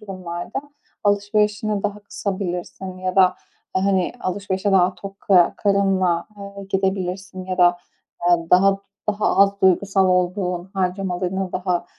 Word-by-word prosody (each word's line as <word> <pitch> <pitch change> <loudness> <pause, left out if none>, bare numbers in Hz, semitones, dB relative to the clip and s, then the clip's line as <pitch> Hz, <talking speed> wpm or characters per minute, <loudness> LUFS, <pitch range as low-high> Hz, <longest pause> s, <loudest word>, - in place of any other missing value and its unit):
durumlarda 185 +2 -6 0.4
alışverişini 205 0 +1
daha 210 0 -3
kısabilirsin 190 -2 -5
ya 185 0 -3
da, 185 -1 +5 0.4
eee, 190 - +1
hani, 190 -2 +1
alışverişe 195 +1 -2
daha 185 -1 +4
tok 195 +2 -10
ka 180 -3 +4
karınla, 195 -4 +1
ııı, 200 0 -9
gidebilirsin 190 -1 -2
ya 185 0 -4
da, 175 -1 +5 0.5
ııı, 170 -1 +1
daha 195 +2 +5 0.3
daha 210 0 +1
az 200 0 +4
duygusal 190 +1 +3
olduğun 180 0 0
harcamalarını 185 0 -2
daha 180 -1 -1
190 Hz, 125 wpm, -21 LUFS, 180-200 Hz, 0.5 s, da